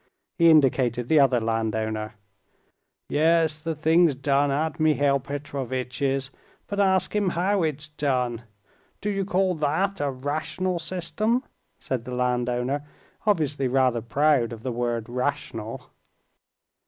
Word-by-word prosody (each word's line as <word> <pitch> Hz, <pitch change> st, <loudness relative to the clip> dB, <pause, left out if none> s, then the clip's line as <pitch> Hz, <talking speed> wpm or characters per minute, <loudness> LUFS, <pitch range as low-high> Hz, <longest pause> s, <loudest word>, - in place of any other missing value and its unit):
He 170 Hz, 0 st, +7 dB
indicated 130 Hz, -5 st, +3 dB
the 155 Hz, -, +5 dB
other 130 Hz, -3 st, +4 dB
landowner. 110 Hz, -1 st, -2 dB, 0.9 s
"Yes, 160 Hz, 0 st, +2 dB
the 165 Hz, 0 st, -3 dB
thing's 160 Hz, 0 st, +3 dB
done 140 Hz, +1 st, +1 dB
at 155 Hz, +4 st, -1 dB
Mihail 145 Hz, -3 st, +3 dB
Petrovitch's, 135 Hz, -1 st, -3 dB, 0.3 s
but 200 Hz, -, -4 dB
ask 190 Hz, 0 st, +2 dB
him 205 Hz, -3 st, +2 dB
how 185 Hz, +3 st, +1 dB
it's 155 Hz, -1 st, -2 dB
done. 130 Hz, -6 st, -1 dB, 0.6 s
Do 210 Hz, -, -2 dB
you 195 Hz, -1 st, -1 dB
call 190 Hz, -1 st, +1 dB
that 160 Hz, +6 st, 0 dB
a 145 Hz, -, +1 dB
rational 155 Hz, +7 st, -2 dB
system?" 185 Hz, -, -1 dB, 0.3 s
said 125 Hz, -2 st, -4 dB
the 125 Hz, -, -5 dB
landowner, 125 Hz, +2 st, 0 dB, 0.4 s
obviously 150 Hz, -8 st, +1 dB
rather 125 Hz, -2 st, +2 dB
proud 135 Hz, 0 st, +2 dB
of 115 Hz, -1 st, -8 dB
the 130 Hz, -, -2 dB
word 120 Hz, -1 st, -2 dB
"rational." 125 Hz, -2 st, -4 dB
140 Hz, 125 wpm, -25 LUFS, 125-160 Hz, 0.9 s, He